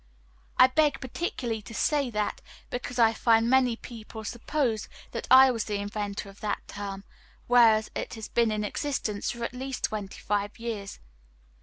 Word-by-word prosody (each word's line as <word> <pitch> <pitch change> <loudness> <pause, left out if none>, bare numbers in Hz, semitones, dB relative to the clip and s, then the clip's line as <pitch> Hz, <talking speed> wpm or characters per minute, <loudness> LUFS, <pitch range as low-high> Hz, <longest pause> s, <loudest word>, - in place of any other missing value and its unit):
I 255 - +9
beg 285 +1 +2
particularly 245 -5 -3
to 225 +2 -10
say 285 0 +1
that, 210 -2 -2 0.3
because 245 0 -4
I 225 -2 +5
find 225 0 +3
many 255 -1 +4
people 225 -2 -9
suppose 240 0 -1 0.2
that - - -5
I 260 0 +9
was 230 -3 -2
the 210 - -2
inventor 205 0 -4
of 195 0 -13
that 210 -1 -3
term, 200 -1 -6 0.4
whereas 225 -3 +5
it - - -4
has 220 -1 -7
been 235 -1 +2
in 210 0 -1
existence 210 -2 -2
for 235 -1 -4
at 235 - -3
least 260 +1 -5
twenty 205 -3 -3
five 205 0 -2
years. 225 -4 -5
225 Hz, 165 wpm, -28 LUFS, 210-250 Hz, 0.4 s, I